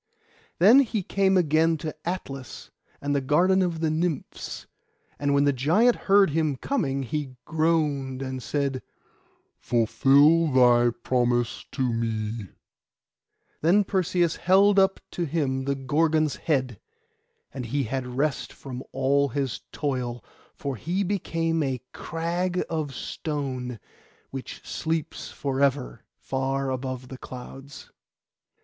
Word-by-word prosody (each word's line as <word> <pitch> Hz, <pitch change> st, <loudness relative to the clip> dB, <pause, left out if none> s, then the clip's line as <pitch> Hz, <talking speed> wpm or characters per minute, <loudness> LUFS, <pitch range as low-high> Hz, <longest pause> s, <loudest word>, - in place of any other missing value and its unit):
Then 215 Hz, +10 st, +7 dB
he 225 Hz, -7 st, +1 dB
came 195 Hz, +1 st, +2 dB
again 160 Hz, -1 st, +3 dB
to 155 Hz, 0 st, -5 dB
Atlas, 135 Hz, -8 st, -6 dB, 0.3 s
and 145 Hz, 0 st, -1 dB
the 140 Hz, -, +1 dB
garden 175 Hz, +8 st, +3 dB
of 170 Hz, -3 st, -1 dB
the 160 Hz, -1 st, +1 dB
Nymphs; 160 Hz, -2 st, -3 dB, 0.5 s
and 145 Hz, 0 st, +1 dB
when 140 Hz, -, +4 dB
the 145 Hz, 0 st, +3 dB
giant 175 Hz, -, +3 dB
heard 195 Hz, -3 st, +6 dB
him 155 Hz, -2 st, +1 dB
coming 140 Hz, -, -1 dB
he 135 Hz, +1 st, -4 dB
groaned, 150 Hz, -5 st, 0 dB
and 130 Hz, -1 st, -4 dB
said, 140 Hz, 0 st, -1 dB, 0.8 s
'Fulfil 140 Hz, +7 st, +4 dB
thy 120 Hz, -2 st, +5 dB
promise 120 Hz, -2 st, 0 dB
to 130 Hz, -3 st, 0 dB
me.' 110 Hz, -2 st, -2 dB, 1.1 s
Then 185 Hz, +6 st, +4 dB
Perseus 175 Hz, -3 st, +1 dB
held 195 Hz, +2 st, +5 dB
up 195 Hz, 0 st, +3 dB
to 175 Hz, -, -2 dB
him 135 Hz, -4 st, -1 dB
the 140 Hz, 0 st, 0 dB
Gorgon's 155 Hz, +2 st, +1 dB
head, 130 Hz, -, -1 dB, 0.7 s
and 125 Hz, -3 st, -5 dB
he 140 Hz, +4 st, 0 dB
had 130 Hz, +2 st, -3 dB
rest 135 Hz, +4 st, -1 dB
from 130 Hz, -2 st, -8 dB
all 140 Hz, +2 st, +2 dB
his 135 Hz, -2 st, -2 dB
toil; 125 Hz, -5 st, -3 dB, 0.3 s
for 140 Hz, -3 st, -4 dB
he 175 Hz, -, -1 dB
became 165 Hz, -4 st, -1 dB
a 135 Hz, -3 st, -1 dB
crag 175 Hz, +2 st, -2 dB
of 155 Hz, -3 st, -2 dB
stone, 130 Hz, -7 st, -4 dB, 0.5 s
which 135 Hz, -1 st, -8 dB
sleeps 160 Hz, -1 st, -3 dB
for 135 Hz, -1 st, -3 dB
ever 135 Hz, -4 st, 0 dB
far 135 Hz, 0 st, -2 dB
above 130 Hz, -1 st, -4 dB
the 130 Hz, -, -9 dB
clouds. 135 Hz, +2 st, -10 dB
140 Hz, 125 wpm, -26 LUFS, 130-165 Hz, 1.1 s, Then